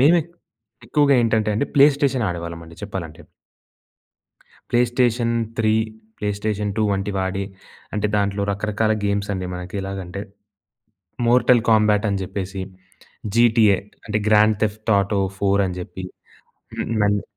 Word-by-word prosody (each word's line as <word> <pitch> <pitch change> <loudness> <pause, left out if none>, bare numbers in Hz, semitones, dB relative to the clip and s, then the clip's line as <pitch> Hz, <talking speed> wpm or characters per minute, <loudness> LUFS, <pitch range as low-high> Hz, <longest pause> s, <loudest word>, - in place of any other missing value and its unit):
మేమె 165 +6 +6 0.7
ఎక్కువగా 140 +3 +3
ఏంటంటే 110 -2 +1
అండి 140 - 0
ప్లే 140 0 +8
స్టేషన్ 135 -5 +1
ఆడేవాళ్ళం 85 -1 -5
అండి, 85 0 -14
చెప్పాలంటే. 95 -6 -6 1.5
Play 120 - +3
station 120 -2 +2 0.2
three, 110 -3 +2 0.5
play 105 - -2
station 105 -1 -2
two 110 - +1
వంటివి 95 0 -2
ఆడి, 95 +1 -2 0.5
అంటే 105 0 0
దాంట్లో 100 0 0
రకరకాల 105 +2 0
గేమ్స్ 100 0 -1
అండి 95 -1 -3
మనకి 90 +3 -6
ఎలాగంటే, 95 -1 -5 1.1
మోర్టల్ 125 -1 +5
కాంబ్యాట్ 105 -1 +4
అని 100 -1 -1
చెప్పేసి 95 0 -5 0.7
జీటీఏ 115 -4 +5 0.3
అంటే, 105 -1 0
గ్రాండ్ 105 0 +4
తెఫ్ట్ 110 +1 -1
ఆటో 100 0 0 0.2
ఫోర్ 100 0 +2
అని 90 - -5
చెప్పి 90 +1 -7 0.7
హ్మ్. - - -2
నన్ను 105 -1 +2
105 Hz, 130 wpm, -22 LUFS, 95-110 Hz, 1.5 s, ప్లే